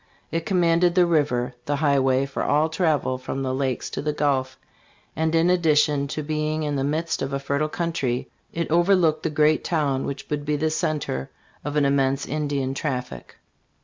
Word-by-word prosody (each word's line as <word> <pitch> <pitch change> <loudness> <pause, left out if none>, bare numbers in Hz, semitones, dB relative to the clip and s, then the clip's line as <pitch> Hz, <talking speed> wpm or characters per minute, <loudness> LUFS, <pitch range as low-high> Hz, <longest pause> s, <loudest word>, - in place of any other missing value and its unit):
It 165 -1 -2
commanded 175 -1 +3
the 180 -1 +5
river, 145 -7 +1
the 145 - +1
highway 140 -2 +2
for 135 - -4
all 150 +2 +2
travel 155 -6 0
from 135 +1 -4
the 130 -1 -1
Lakes 130 -2 -1
to - - -3
the 150 - -1
Gulf, 135 -3 0 0.6
and 160 +1 0
in 165 +2 +4
addition 150 -4 +3
to 155 +2 -4
be 155 0 -1
ing 155 0 -2
in 145 -1 -1
the 135 - 0
midst 160 +3 -1
of 135 +1 -3
a 140 - 0
fertile 140 +2 -1
country, 150 -8 -2 0.2
it 170 -2 -3
overlooked 170 -2 +3
the 160 - -1
great 150 +1 +2
town 145 -5 0
which 140 0 -6
would 145 -1 -1
be 150 0 0
the 155 +2 0
center 145 - -2 0.3
of 145 +1 -4
an 150 -1 +3
immense 140 0 +1
Indian 145 -3 -2
traffic. 130 -3 -4
150 Hz, 185 wpm, -24 LUFS, 135-160 Hz, 0.6 s, the